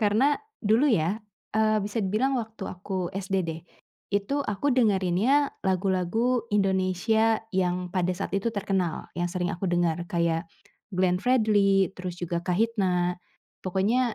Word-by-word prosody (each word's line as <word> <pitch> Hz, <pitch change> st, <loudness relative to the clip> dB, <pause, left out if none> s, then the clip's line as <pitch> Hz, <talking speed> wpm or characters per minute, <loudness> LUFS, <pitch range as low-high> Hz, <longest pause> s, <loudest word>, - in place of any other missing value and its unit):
Karena 220 Hz, +8 st, +3 dB, 0.3 s
dulu 230 Hz, +8 st, +4 dB
ya, 195 Hz, +2 st, +1 dB, 0.3 s
eee, 215 Hz, 0 st, +3 dB
bisa 210 Hz, +1 st, -2 dB
dibilang 220 Hz, +8 st, +1 dB
waktu 220 Hz, -2 st, -8 dB
aku 185 Hz, -1 st, -4 dB
SD 195 Hz, 0 st, -3 dB
deh, 165 Hz, 0 st, -4 dB, 0.5 s
itu 200 Hz, +7 st, 0 dB
aku 275 Hz, +5 st, -1 dB
dengerinnya 225 Hz, +4 st, +3 dB, 0.2 s
lagu-lagu 190 Hz, +6 st, +1 dB
Indonesia 200 Hz, +3 st, +2 dB
yang 180 Hz, -1 st, -1 dB
pada 180 Hz, -1 st, 0 dB
saat 195 Hz, -, -4 dB
itu 215 Hz, +4 st, -1 dB
terkenal, 190 Hz, -4 st, -2 dB
yang 175 Hz, -, +1 dB
sering 180 Hz, 0 st, -1 dB
aku 185 Hz, +2 st, -3 dB
dengar 175 Hz, -2 st, +1 dB
kayak 170 Hz, -1 st, 0 dB, 0.5 s
Glenn 180 Hz, 0 st, +2 dB
Fredly, 205 Hz, -5 st, +3 dB
terus 180 Hz, -1 st, -4 dB
juga 175 Hz, -1 st, -2 dB
Kahitna, 180 Hz, -3 st, +1 dB, 0.4 s
pokoknya 215 Hz, +6 st, +1 dB
195 Hz, 130 wpm, -26 LUFS, 180-220 Hz, 0.5 s, dulu